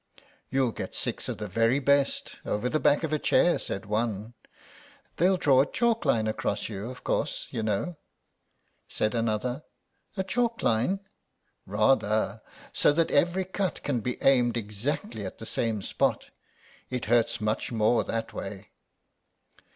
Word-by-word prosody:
"You'll 130 -3 +1
get - - -6
six - - -1
of - - -3
the 105 - -5
very 115 +6 +2
best, 140 0 +1
over 110 +4 -1
the 155 - +1
back 145 +3 +3
of 155 -1 -1
a 155 - +1
chair," 175 - +3
said 95 - -4
one. 110 +1 -2 0.8
"They'll 185 +2 +4
draw 135 -6 +5
a 140 - -1
chalk 230 -5 +1
line 115 -6 +3
across 110 - -1
you, 105 +2 -5
of 130 - -10
course - - -1
you 115 - -2
know," 110 - -1 0.9
said 110 - -1
another. 115 +4 -1 0.5
"A 190 - +1
chalk 230 +4 -1
line?" 125 - +1 0.7
"Rather. 110 0 +2 0.3
So - - +4
that 165 +2 +1
every 175 +5 +2
cut 190 -1 -2
can 135 -4 0
be 125 +2 -3
aimed 120 -3 +4
exactly 110 - -3
at 95 - -6
the 110 - -8
same 110 -3 -1
spot. - - 0 0.6
It 125 -2 -3
hurts 120 +1 +2
much 110 +2 -1
more 115 +1 +3
that 115 0 -3
way." 100 +1 -7
120 Hz, 150 wpm, -28 LUFS, 110-145 Hz, 0.9 s, draw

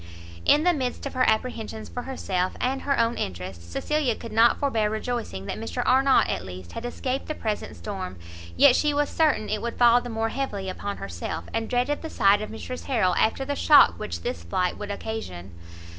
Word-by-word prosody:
In 295 +1 +5
the 355 0 +4
midst 260 -4 -3
of 275 - -4
her 255 0 +3
apprehensions 220 -1 -2
for 245 - -5
herself 185 -8 -2
and 265 +2 -1
her 280 -1 0
own 230 0 +1
interest, 90 -2 -6
Cecilia 295 - 0
could 230 0 -9
not 225 +2 +5
forbear 225 -7 +1
rejoicing 220 - -3
that - - -4
Mr 225 +2 -3
Arnott, 265 +1 +4
at - - -2
least, 90 -1 -9
had 235 - -6
escaped 255 +2 -3
the 310 - -3
present 215 -2 -3
storm; 190 - -6 0.4
yet 280 -3 +7
she 295 -1 +2
was 290 0 +1
certain 300 -9 +2
it 215 0 -2
would 235 0 -4
fall 240 0 +6
the 245 - -7
more 225 0 -1
heavily 210 -7 -3
upon 200 +2 -4
herself; 85 -2 -5
and 225 0 -2
dreaded 250 +4 0
the 320 - -5
sight 200 -4 +4
of 215 - -5
Mrs 250 +3 -7
Harrel 215 -9 +2
after 225 +8 +1
the 285 +1 -2
shock 280 - +6
which 85 0 -5
this 85 - -3
flight 180 - -1
would 205 -1 -5
occasion. 200 - -5
225 Hz, 205 wpm, -25 LUFS, 195-260 Hz, 0.4 s, yet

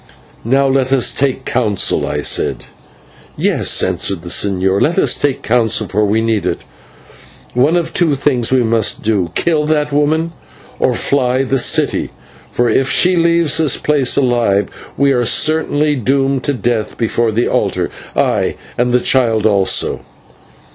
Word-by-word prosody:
"Now 135 +4 +1
let 135 -1 0
us 135 -3 +3
take 135 -1 -1
counsel," 110 -6 0
I - - -3
said. - - -1 0.7
"Yes," - - +1
answered 95 -1 -2
the 85 - -8
señor, 95 0 +1
"let 165 - +1
us - - +3
take 140 -2 -2
counsel, 115 -2 0
for 105 +2 0
we 105 +2 0
need 115 -2 -1
it. - - -3 0.9
One 140 +8 +2
of 165 -1 -3
two 160 -5 +1
things 130 -4 0
we 130 -2 +3
must 115 -2 0
do; 100 -5 0
kill 155 -3 0
that 150 -1 0
woman, 155 +3 0 0.5
or - - +1
fly 130 -1 +1
the 135 0 -1
city, - - +1 0.4
for 120 - 0
if 130 +2 +1
she 180 +1 +3
leaves 170 -2 +2
this 155 -5 +1
place 145 -4 +1
alive 120 -7 +1 0.3
we 140 0 +2
are 125 -2 +1
certainly 150 +2 +1
doomed 135 +1 0
to 145 - 0
death 120 -4 -2
before 115 0 0
the 115 +3 0
altar, - - -1 0.2
ay! - - 0 0.2
and 120 0 +1
the 125 - +3
child 115 -5 +1
also." 100 -3 +1
130 Hz, 155 wpm, -15 LUFS, 110-145 Hz, 0.9 s, us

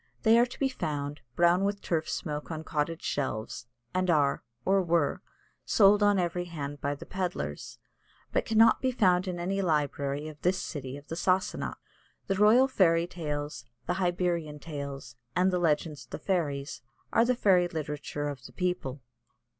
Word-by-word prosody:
They 225 0 +6
are 240 - +4
to 250 - -11
be 275 - +3
found 145 - -4
brown 175 +2 +4
with 200 0 0
turf 160 -2 -1
smoke 150 -1 -4
on 160 -1 -4
cottage 160 +1 -2
shelves, 120 -3 -3 0.3
and 185 0 0
are, 145 -4 +3 0.2
or 195 +1 +4
were, 170 -4 +1 0.4
sold 205 0 +5
on 205 -1 +4
every 175 0 -1
hand 145 -4 -6
by 145 +1 -1
the - - -10
pedlars, 180 - -4 0.5
but - - +1
cannot 225 +1 +5
be 260 - +2
found 185 -6 +3
in 180 -1 -3
any 195 +3 -1
library 145 -3 0
of 150 -2 -10
this 185 +1 +2
city 135 -5 -5
of 145 - -14
the 165 - -3
Sassanach. 185 +2 0 0.5
"The 195 - 0
Royal 215 +7 +6
Fairy 170 -9 +3
Tales," 150 -6 -4 0.2
"The - - 0
Hibernian 175 -4 0
Tales," 140 -5 -7 0.2
and 185 +2 +3
"The 180 - +1
Legends 150 -4 0
of - - -37
the - - -5
Fairies" 150 -7 -2 0.3
are 230 - +5
the 250 +1 +2
fairy 185 -6 +4
literature 150 -3 -4
of 145 -2 -6
the - - -11
people. 150 -8 -2
170 Hz, 170 wpm, -29 LUFS, 145-185 Hz, 0.5 s, They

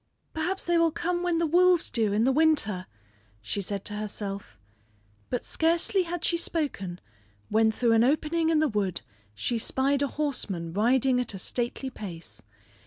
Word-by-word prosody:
"Perhaps 355 +4 -2
they 345 -1 +3
will 335 0 +4
come 350 +2 -2
when 350 -2 +1
the 335 - +2
wolves 355 +1 +4
do 220 -3 +1
in 210 +2 +2
the 260 - +4
winter," 265 -11 +2 0.5
she 110 - -3
said 200 0 -4
to 210 - -3
herself; 205 - -5 0.7
but 245 - -2
scarcely 335 +4 +2
had 350 -1 -3
she 340 - +2
spoken 235 - -2 0.5
when 220 +1 +3
through 230 +1 +2
an 225 0 +5
opening 310 +5 +1
in 325 - +3
the 310 0 +3
wood 205 -7 -1 0.3
she 230 - -1
spied 270 +4 +1
a 285 - +2
horseman 210 - -3
riding 250 +5 +3
at 245 -5 -3
a - - -4
stately 245 +6 -3
pace. 170 - -8
255 Hz, 170 wpm, -27 LUFS, 205-320 Hz, 0.7 s, an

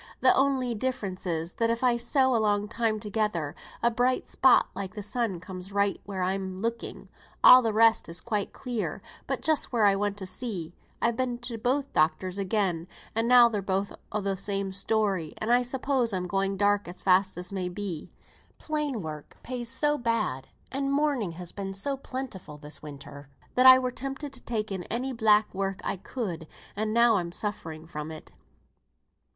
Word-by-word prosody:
Th' - - +5
only 265 -3 +2
difference 205 -6 -3
is, 165 0 -2
that 230 0 0
if 230 +2 -1
I 245 -1 +4
sew 255 +2 +2
a 225 - +2
long 205 -1 +1
time 225 -1 -1
together, 205 -8 -1 0.3
a 235 - +4
bright 250 +2 +1
spot 260 -1 +5
like 190 +1 -6
th' 210 - -5
sun 210 -4 -1
comes 185 +1 -8
right 200 0 +1
where 195 -2 -3
I'm 190 0 -2
looking; 230 +3 -4 0.4
all 255 0 +10
the 225 -2 0
rest 225 -1 +4
is 170 +1 -2
quite 210 -1 -2
clear 245 -4 -4 0.2
but - - -2
just 315 -2 +2
where 230 -4 +3
I 200 -1 +5
want 205 0 -1
to 195 - -4
see. 185 -4 -4 0.3
I've 235 0 +2
been 245 0 -1
to 240 -1 -3
both 260 +5 -1
doctors 185 +4 +1
again, 185 -4 0 0.3
and 225 +1 +1
now 245 -1 +8
they're 215 -3 -2
both 195 +1 -1 0.2
o' 210 - -1
the 195 0 -1
same 195 0 -2
story; 195 -4 0
and 220 - -1
I 245 - +5
suppose 255 -2 0
I'm 180 -1 -1
going 195 +1 -1
dark 205 0 +2
as 175 - -9
fast 190 0 +3
as 180 +2 -2
may 185 -2 -2
be. 180 -4 -5 0.5
Plain 300 -7 -2
work 155 -2 -8
pays 245 -2 -5
so 295 +3 +1
bad, 220 - -1 0.2
and 275 +1 -1
mourning 280 - +1
has 175 0 -4
been 195 -1 -5
so 275 +8 -1
plentiful 255 - -7
this 150 0 -6
winter, 140 -1 -10 0.3
I 255 +1 +9
were 255 -1 -1
tempted 275 +3 -5
to 255 - -8
take 215 -3 -3
in 190 -2 -2
any 255 +4 -2
black 220 -2 +3
work 195 0 -2
I - - -1
could; 180 -6 -5 0.3
and 215 +1 -1
now 235 -1 +5
I'm 170 -2 -3
suffering 165 -6 -5
from 150 -2 -6
it." 155 -1 -9
210 Hz, 185 wpm, -28 LUFS, 185-245 Hz, 0.5 s, all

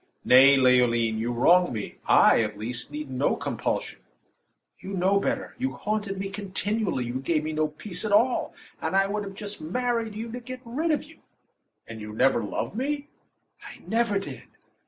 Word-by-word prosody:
"Nay, 135 +2 +7
Leoline, 120 -3 +3
you 115 +2 -1
wrong 175 +9 +4
me. 110 -4 -5
I, - - +6
at 105 -1 -3
least, 120 +3 -5
need 150 -2 -6
no 130 +2 +1
compulsion." - - -3 0.8
"You 195 - -7
know 190 +2 +2
better. - - -2
You 265 +1 -1
haunted 205 -2 -3
me 195 +1 -3
continually; 200 - -2
you 120 +2 -3
gave 155 +3 0
me 155 +1 -3
no 155 0 +1
peace 175 +4 -6
at 215 - -2
all; 235 +5 +2 0.3
and - - -2
I 195 0 +4
would 200 -1 -4
just 205 0 -6
have 155 - -7
married 230 0 -1
you 225 +2 -5
to 245 - -5
get 255 +1 -8
rid 290 +9 -2
of 305 - +1
you." 320 +2 -17 0.7
"And 115 -1 -9
you 105 0 -7
never 120 0 +2
loved 105 - -3
me?" 285 +4 -2 0.5
"I - - -10
never 225 -2 +1
did." 195 - -6
190 Hz, 180 wpm, -26 LUFS, -, 0.8 s, Nay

